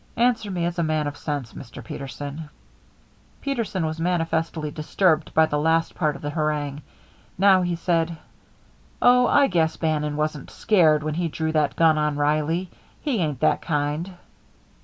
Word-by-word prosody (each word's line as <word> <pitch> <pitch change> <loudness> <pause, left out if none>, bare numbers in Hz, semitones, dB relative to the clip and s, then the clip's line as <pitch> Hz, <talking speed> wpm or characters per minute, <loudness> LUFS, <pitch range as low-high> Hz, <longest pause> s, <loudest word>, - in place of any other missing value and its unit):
Answer 230 -3 +2
me 175 -3 -1
as 175 0 -2
a - - +2
man 155 -1 0
of 145 0 -4
sense, 145 -6 -4
Mr. 120 -2 -10
Peterson." 145 +4 -7 0.9
Peterson 230 -10 -2
was 160 +1 -3
manifestly 165 -2 -1
disturbed 155 +1 +1
by 160 - +6
the 150 -1 -1
last 165 +2 +1
part 155 -4 0
of 140 - -11
the 145 - -3
harangue. 150 -2 -2 0.6
Now 190 0 +5
he 175 -1 -1
said: 165 -1 0 0.8
"Oh, 250 0 +5
I 285 - +5
guess 165 -7 +1
Bannon 150 -2 -1
wasn't 150 -2 -2
scared 160 -8 +3
when 155 0 -2
he 170 +2 -1
drawed 160 0 -3
that 150 -2 +1
gun 160 -2 +4
on 150 -1 0
Reilly. 155 +4 0 0.3
He 275 -8 -1
ain't 150 -7 -2
that 155 -1 +2
kind." 150 +4 -2
160 Hz, 160 wpm, -24 LUFS, 150-175 Hz, 0.9 s, by